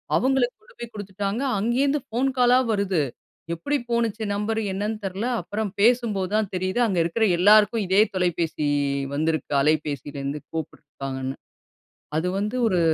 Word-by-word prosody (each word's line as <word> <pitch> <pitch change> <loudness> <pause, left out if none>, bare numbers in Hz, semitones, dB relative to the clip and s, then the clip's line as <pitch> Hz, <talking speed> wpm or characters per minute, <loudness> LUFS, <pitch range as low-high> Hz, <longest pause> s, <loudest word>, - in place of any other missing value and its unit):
அவுங்களுக்கு 260 -1 +2
கொண்டு 480 +1 -21
போய் 235 -1 -7
குடுத்துட்டாங்க. 200 +2 -3 0.2
அங்கேருந்து 270 +7 +1
போன் 255 +4 +2
காலா 250 +1 +5
வருது. 195 -5 +1 0.5
எப்புடி 285 - -1
போணுச்சுன்னா, 225 -3 0
நம்பர் 220 +2 -1
என்னான்னு 210 +3 -3
தெர்ல. 195 +4 -3 0.2
அப்புறம் 210 -1 -3
பேசும்போது 220 -5 +2
தான் 215 -3 0
தெரியுது. 185 +4 -1
அங்க 190 -4 -1
இருக்குற 170 +7 +1
எல்லாருக்கும் 210 +3 +5
இதே 190 +3 +5
தொலைபேசி 170 -4 0 0.5
வந்திருக்கு. 155 +2 -1
அலைபேசியிலருந்து 145 -1 -1
கூப்பிட்ருக்காங்கன்னு. 135 -4 -5 0.8
அது 175 +3 0
வந்து 210 +5 -2
ஒரு 185 -4 +1
200 Hz, 130 wpm, -24 LUFS, 165-230 Hz, 0.8 s, காலா